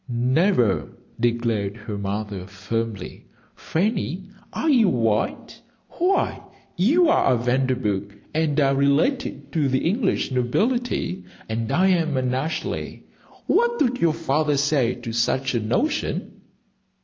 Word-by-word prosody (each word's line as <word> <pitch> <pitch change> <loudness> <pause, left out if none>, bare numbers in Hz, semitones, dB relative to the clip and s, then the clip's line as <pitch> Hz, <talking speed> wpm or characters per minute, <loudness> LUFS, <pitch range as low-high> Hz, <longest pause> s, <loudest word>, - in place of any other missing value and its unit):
"Never!" 125 - +1 0.2
declared 115 -3 0
her 110 -1 -6
mother, 100 -1 -4
firmly. 100 +1 -5 0.3
"Fanny, 190 0 -2 0.2
are 320 - -2
you 240 -9 +5
wild? 115 -6 0 0.4
Why, 365 +3 0 0.3
you 305 - +4
are 325 - +3
a 125 - +3
Vanderburgh 120 -5 -1 0.2
and 155 -1 +1
are 135 -1 +3
related 140 - +1
to 150 -4 +1
the 130 +4 +1
English 195 - 0
nobility, 190 - 0 0.2
and 115 +2 -3
I 185 +6 +3
am 165 -6 +1
an 130 -1 0
Ashleigh. 150 +5 -3 0.4
What 475 0 +2
would 250 -2 +1
your 165 -2 +3
father 150 -2 +1
say 140 -4 +2
to 120 -2 -7
such 130 +3 0
a 120 - +1
notion?" 125 - -2
135 Hz, 125 wpm, -23 LUFS, 115-185 Hz, 0.4 s, you